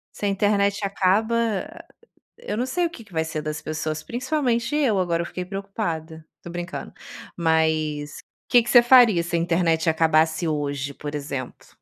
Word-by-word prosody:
Se - - -4
a 200 - +2
internet 200 0 +1
acaba 225 - 0 0.5
eu 210 - -5
não 250 - 0
sei 350 +7 0
o - - -1
que 295 -9 -12
que 195 - -20
vai 160 - +1
ser 160 -1 -4
das 155 +1 -4
pessoas, 155 0 -4
principalmente 255 0 -1
eu, 260 -10 +2
agora 170 -2 0
eu - - -3
fiquei 180 +1 -6
preocupada. 175 -5 -5 0.2
Tô - - -9
brincando, 175 +1 -6 0.5
mas 160 -3 0 0.3
que 245 - +6
que 235 - -6
você 240 - +8
faria 240 -8 +6
se 170 0 -3
a - - +2
internet 165 -1 +1
acabasse 160 +1 +2
hoje, 145 -2 -2
por 145 +1 -6
exemplo? 140 -3 -6
175 Hz, 175 wpm, -23 LUFS, 160-220 Hz, 0.5 s, você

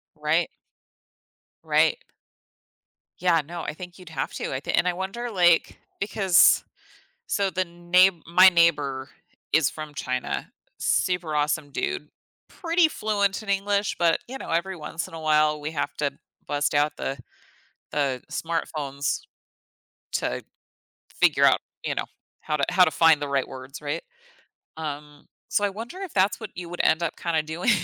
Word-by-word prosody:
Right. - - +1 1.1
Right. 485 - +3 1.2
Yeah, 175 -3 +3
no, 170 +1 -6
I - - -4
think 180 +1 -10
you'd 180 -2 -12
have 160 - -3
to. - - -3
I 130 - -1
thi - - -4
and 180 - +2
I 180 - +2
wonder, 195 +7 -4
like 175 -3 +3 0.2
because 195 -2 +4 0.6
so, 200 -2 +1
the 185 0 -1
neigh 175 +2 +4 0.2
my 185 +2 +8
neighbor 145 -6 +2 0.4
is 160 -3 +4
from 155 -1 -8
China, 125 - -3 0.3
super 180 -4 0
awesome 150 0 0
dude, 150 +2 -3 0.4
pretty 335 -2 +2
fluent 205 -7 0
in 215 - -10
English, 200 +1 +1
but, 170 -2 +3
you 265 +2 -6
know, - - -8
every 180 +3 0
once 165 0 -5
in - - -15
a 165 - -6
while, 150 -1 +3
we 150 +2 -4
have 150 - -2
to 145 -2 0 0.4
bust 145 0 0
out 145 +1 +2
the 135 - -3 0.7
the 135 -3 0
smartphones 150 -4 -2 0.9
to - - -1 0.8
figure - - +5
out, - - +5 0.2
you - - -1
know, - - -2 0.4
how 150 - -1
to 140 - +1
how 180 0 +6
to 160 - +1
find 160 -1 +5
the 145 - -2
right 140 -1 0
words, 130 +2 -9
right? 150 +3 -3 0.8
Um, 150 -1 -7 0.2
so 205 - +1
I - - +1
wonder 225 - -8
if 385 -4 -6
that's 195 +3 +2
what 220 - -6
you 175 -1 -7
would 175 - -2
end 165 +2 +3
up, 165 - -2
kinda 165 -2 0
doing 160 +7 -2
165 Hz, 160 wpm, -25 LUFS, 150-190 Hz, 1.2 s, my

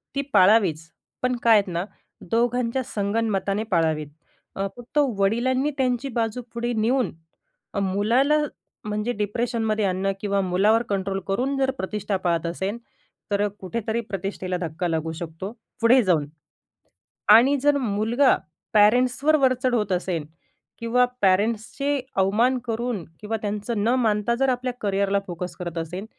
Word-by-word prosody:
ती 280 - +1
पाळावीच. 185 -5 +4 0.3
पण 250 0 +1
काय 230 - +6
आहेत 200 -1 +1
ना? 170 +2 -1 0.5
दोघांच्या 240 +2 +1
संगनमताने 205 -2 -1
पाळावेत. 160 -3 +1 0.5
अ, 195 0 -1
फक्त 245 +4 -9 0.2
वडिलांनी 255 +8 +1
त्यांची 255 0 0
बाजू 225 +2 -1
पुढे 240 +1 -2
नेऊन 240 +3 +1 0.6
अ, - - +1
मुलाला 220 +10 +2 0.5
म्हणजे 210 +3 -2
डिप्रेशनमध्ये 220 0 -1
आणणं 190 +1 0
किंवा 200 -1 0
मुलावर 200 +5 +3
कंट्रोल 195 -1 -1
करून 255 +8 0
जर 265 -1 +2
प्रतिष्ठा 200 -1 -2
पाळत 170 -2 +1
असेन, 190 +6 -3 0.5
तर 205 +1 +2
कुठेतरी 220 +4 -3
प्रतिष्ठेला 190 -1 -3
धक्का 170 +1 -2
लागू 160 -1 -1
शकतो, 170 +4 -6 0.3
पुढे 245 +3 +6
जाऊन 170 -7 +2 1.1
आणि 250 +6 +7
जर 290 0 +4
मुलगा 235 +2 +2 0.4
पॅरेंट्सवर 250 +8 +4
वरचढ 255 -2 +2
होत 210 -4 0
असेल 180 -3 -1 0.5
किंवा 240 +2 +3 0.2
पॅरेंट्सचे 220 +8 +1 0.2
अवमान 220 +7 +3
करून 235 -4 -2 0.2
किंवा 220 +1 -2
त्यांच 210 +2 -3
न 205 +2 0
मानता 215 +1 +1
जर 270 +2 +1
आपल्या 250 0 -1
करिअरला 200 -1 +1
फोकस 175 -1 -5
करत 175 -1 -6
असेन, 180 +5 -4
210 Hz, 135 wpm, -24 LUFS, 190-245 Hz, 1.1 s, आणि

